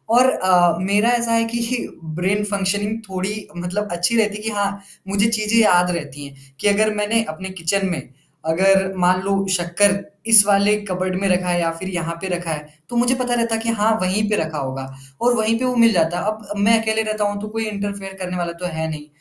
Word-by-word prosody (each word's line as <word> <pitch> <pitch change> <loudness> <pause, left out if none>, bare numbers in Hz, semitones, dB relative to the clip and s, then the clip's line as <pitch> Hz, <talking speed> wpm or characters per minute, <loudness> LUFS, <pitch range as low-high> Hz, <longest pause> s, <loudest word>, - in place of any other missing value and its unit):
और 255 +1 +6
अ, 180 -4 +3
मेरा 200 +5 +2
ऐसा 235 -1 +1
है 230 0 +3
कि 235 +1 -2 0.3
ब्रेन 195 +4 0
फंक्शनिंग 205 +1 -1
थोड़ी 195 +3 -4
मतलब 180 +4 -3
अच्छी 175 +7 0
रहती 210 -2 +1
है 210 - -10
कि 225 - -1
हाँ, 200 -1 -2 0.3
मुझे 200 +2 +2
चीज़ें 215 0 0
याद 180 -5 +4
रहती 145 -4 -6
हैं, 135 -1 -16
कि - - 0
अगर 215 +1 +3
मैनें 215 +2 +1
अपने 170 +5 -7
किचन 195 +4 +1
में 165 -6 -2 0.5
अगर 190 +3 +3
मान 180 +1 +3
लो 195 +1 -2 0.2
शक्कर 185 +2 +2 0.3
इस 220 -3 +8
वाले 200 +1 +4
कपबोर्ड 185 0 -2
में 200 - +1
रखा 180 0 +1
है 175 0 +1
या 165 -1 +1
फ़िर 190 +3 -6
यहाँ 170 -2 -3
पे 190 - -3
रखा 175 -2 -3
है, 150 -1 -5 0.2
तो - - -6
मुझे 245 +2 +3
पता 250 -1 -1
रहता 230 -1 +1
है 225 - -3
कि 230 - -2
हाँ, 220 0 +2
वही 185 +3 +1
पे 210 - +2
रखा 160 -1 -2
होगा 135 -1 -4 0.4
और 245 +1 +3
वही 220 0 +1
पे 255 - -1
वो 250 0 0
मिल 230 -1 +5
जाता 170 -1 +1
है। - - -4
अब 215 0 -3
अब 205 - -4
मैं 225 +3 +4
अकेले 220 0 0
रहता 215 -1 -2
हूँ 205 0 -4
तो 210 - -5
कोई 225 +1 -3
इंटरफेयर 200 -1 -5
करने 180 -1 -4
वाला 175 -1 -2
तो 180 - -4
है 160 -2 -3
नहीं, 150 -1 -7
200 Hz, 230 wpm, -20 LUFS, 175-215 Hz, 0.5 s, इस